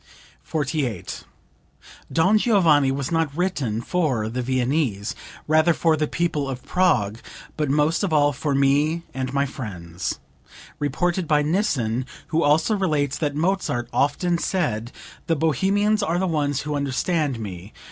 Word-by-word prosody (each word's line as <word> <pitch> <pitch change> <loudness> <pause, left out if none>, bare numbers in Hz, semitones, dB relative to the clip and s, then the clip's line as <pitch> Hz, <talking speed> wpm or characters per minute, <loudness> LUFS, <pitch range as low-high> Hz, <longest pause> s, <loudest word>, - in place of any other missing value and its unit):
48. 140 - -3 0.9
"'Don 185 +6 +3
Giovanni' 165 - +4
was 135 +1 -3
not 165 -2 +1
written 140 - -1
for 130 -8 0
the 125 +3 -3
Viennese; 125 -4 0 0.3
rather 155 +2 +4
for 165 -2 +3
the 155 0 0
people 150 -5 -1
of 125 -2 -5
Prague, 115 - +1 0.4
but 150 -2 -1
most 150 +3 +2
of 195 - 0
all 145 -1 +3
for 140 +1 -1
me 145 +4 +2
and 130 -1 -3
my 140 +1 +1
friends." 95 - -5 0.6
(Reported 170 +5 0
by 150 -1 +3
Nissen, 130 - 0 0.2
who 165 -1 +1
also 160 +8 +3
relates 150 -8 0
that 145 -3 -1
Mozart 160 -8 0
often 170 +5 +1
said 120 - -1 0.4
"The 165 - +2
Bohemians 195 +8 +2
are 175 -4 0
the 190 - +1
ones 145 -5 0
who 150 0 -4
understand 145 0 -1
me." 95 -2 -7
150 Hz, 140 wpm, -23 LUFS, 130-170 Hz, 0.9 s, Giovanni